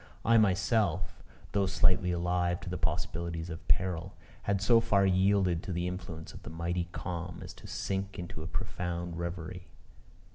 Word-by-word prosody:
I 115 0 +6
myself, 100 0 +2 0.3
though 100 -1 +2
slightly 90 -1 +3
alive 90 0 +1
to 90 - -5
the 90 - -1
possibilities 85 0 -2
of 80 - -8
peril, 90 -4 +1 0.3
had 100 -1 +1
so 115 +4 +6
far 100 -3 +3
yielded 95 -2 +3
to 95 - -5
the 85 0 -1
influence 85 -3 -6
of - - -10
the - - -8
mighty 85 +2 -2
calm 90 -1 -4
as - - -8
to - - -12
sink 95 0 -2
into 85 -3 -6
a 80 - -5
profound 85 -1 -3
reverie. 85 +1 -5
90 Hz, 160 wpm, -31 LUFS, 85-95 Hz, 0.3 s, I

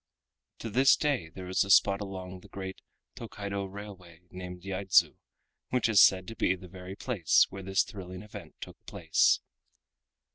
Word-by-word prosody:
To 115 - -6
this 130 +5 +5
day 140 - -1
there 90 +2 -9
is 95 - +2
a 100 - -8
spot 100 +1 +5
along 95 -2 -7
the 100 - -16
great 95 0 -7 0.3
Tokaido 100 -3 -5
railway 95 -4 -11
named 90 -1 -8
Yaidzu, 95 -1 +2 0.5
which 125 -2 +1
is 110 -4 +6
said 95 -1 +5
to 115 - -8
be 90 - +1
the 90 0 -12
very 90 +1 -9
place 100 - +3
where 95 0 -7
this 95 +1 +1
thrilling 95 -1 -9
event 105 - -11
took - - -10
place. 80 -2 +2
95 Hz, 160 wpm, -29 LUFS, 90-100 Hz, 0.5 s, is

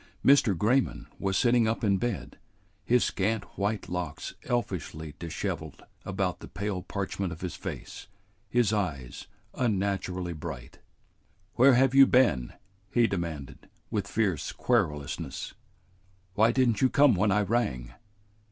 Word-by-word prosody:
Mr. 130 -9 +5
Grayman 125 +9 +1
was 95 -1 0
sitting 120 -2 +3
up 115 +1 -1
in 100 -2 +3
bed, 120 -3 -4 0.4
his 125 0 +3
scant 105 +2 0
white 100 +1 -2
locks 90 -4 -4
elfishly 80 -10 -3
disheveled 85 -2 -5 0.2
about 95 -3 -2
the - - -10
pale 100 -1 -3
parchment 95 0 -3
of 80 - -8
his 90 -1 -4
face, - - -7 0.4
his 120 -4 +2
eyes 75 -12 -3 0.3
unnaturally 95 -6 -1
bright. 65 -6 -8 0.7
"Where 130 +1 +6
have 130 +1 +4
you 135 0 +8
been?" 95 - +3 0.4
he 120 -1 +4
demanded, 85 - -4 0.2
with - - -1
fierce 95 -9 0
querulousness. 75 -2 -1 0.8
"Why 110 +4 +4
did 130 0 +3
n't 115 - -1
you 130 - +5
come 140 -1 +5
when 100 +2 +2
I 105 +2 +3
rang?" 95 - -1
100 Hz, 135 wpm, -28 LUFS, 85-120 Hz, 0.8 s, you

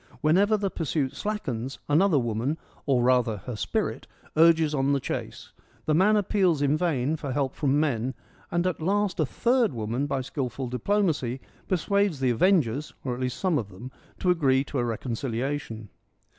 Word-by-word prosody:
Whenever 200 +8 +4
the 200 -2 -2
pursuit 150 -4 -2
slackens, 135 - -3
another 160 +3 +4
woman 120 +4 -1
— - - -29
or 130 -3 +3
rather 125 -3 +3
her 125 - -4
spirit 105 - -2 0.2
— - - -27
urges 160 -1 +5
on 135 -1 +1
the 140 - +2
chase. - - -5 0.3
The 155 - +2
man 190 +7 +4
appeals 185 -7 +2
in 145 +1 +3
vain 155 -4 0
for 145 -3 -5
help 135 -1 -1
from 145 0 +1
men, 130 -4 0 0.3
and 175 +1 0
at 185 -3 -1
last 200 +2 0
a 155 - +2
third 240 - +2
woman 115 +5 -2
by 135 -2 -1
skilful 130 -1 -4
diplomacy 135 - 0 0.3
persuades 195 -2 +1
the 130 -2 +2
avengers 145 - +2
— - - -40
or 125 - -1
at 120 - -6
least 125 -1 -2
some 180 -6 +1
of 105 -4 -5
them 100 +7 -10
— - - -29
to 180 - +3
agree 135 -6 +3
to 140 -1 -4
a - - +1
reconciliation. 120 0 -3
145 Hz, 185 wpm, -26 LUFS, 125-175 Hz, 0.3 s, urges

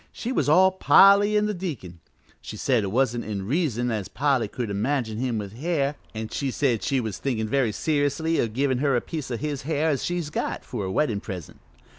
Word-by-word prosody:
She 240 - -5
was 250 - +1
all 185 +5 +6
Polly 200 +2 +6
an' 210 - +2
the 210 - -1
deacon. 140 - -6 0.4
She - - -8
said 125 -5 +1
it 95 - -3
wa'n't 120 0 +1
in 100 -3 -4
reason 125 - 0
as 105 -4 -3
Polly 135 -4 +1
could 115 0 -4
imagine 110 +1 -1
him 125 -3 -1
with 100 -1 -5
hair, 145 +1 -1 0.2
an' 110 0 -4
she 140 - -2
said 125 -5 0
she 135 +8 0
was 110 -6 -4
thinkin' 115 -5 -1
very 125 -1 +1
seriously 150 +5 0
o' - - 0
givin' 130 +3 0
her 140 -1 +2
a 120 - +1
piece 155 -5 -6
o' 120 - -2
his 145 +1 -3
hair 155 +2 0
as 135 - -2
she's 175 -4 -2
got, - - -3
for 105 -6 -4
a 95 - -3
weddin' 110 -3 0
present. 90 -8 -8
130 Hz, 215 wpm, -25 LUFS, 110-150 Hz, 0.4 s, all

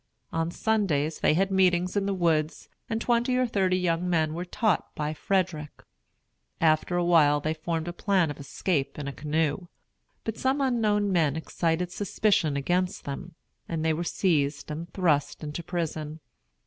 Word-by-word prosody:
On 165 0 0
Sundays 170 -7 0
they - - +3
had 195 +3 +1
meetings 180 -1 +2
in 200 -1 +1
the 200 - 0
woods, 160 -3 0 0.2
and 225 -1 -1
twenty 240 +2 +1
or 255 - +3
thirty 190 -5 +1
young 180 0 0
men 160 -3 +1
were 175 +2 -4
taught 210 +1 0
by 150 -1 -2
Frederick. 165 -3 -2 0.8
After 160 +2 +2
a 175 - +1
while 150 -4 +5
they 155 +2 -1
formed 160 +1 -3
a 175 - -3
plan 185 -4 +1
of 145 - -9
escaping 140 0 -2
in 140 - -5
a 140 - -4
canoe. 155 +4 -1 0.6
But 220 -1 -4
some 265 +2 +1
unknown 215 -6 +1
men 160 -6 +2
excited 165 +2 -1
suspicion 195 -7 +1
against 180 +6 -1
them, 150 +4 -6 0.3
and 160 -1 -2
they 160 - +3
were 165 +3 -2
seized 155 -5 0
and 165 +3 -6
thrust 155 -6 0
into 150 +3 -4
prison. 160 -3 -4
170 Hz, 165 wpm, -27 LUFS, 155-190 Hz, 0.8 s, while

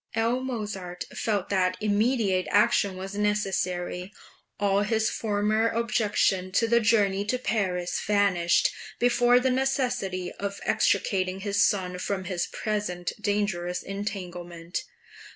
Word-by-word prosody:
L. 230 +3 +1
Mozart 205 -8 -4
felt 205 -4 -1
that 185 -2 +1
immediate 210 -2 +1
action 200 -2 +3
was 190 +1 -6
necessary; 190 -3 -1 0.5
all 200 0 +2
his 220 +1 +1
former 215 +1 +1
objection 210 -5 +1
to 230 +3 +3
the 235 +1 +4
journey 205 -3 +2
to 250 +5 0
Paris 185 -8 -1
vanished 195 -4 +3 0.3
before 245 0 +4
the 260 +1 +1
necessity 250 -9 -1
of 200 0 -4
extricating 190 -1 +1
his 205 0 +1
son 180 -3 0
from 190 0 -2
his 180 -1 -2
present 205 -5 -3
dangerous 200 -4 -1
entanglement. 180 -4 -5
200 Hz, 115 wpm, -27 LUFS, 185-220 Hz, 0.5 s, the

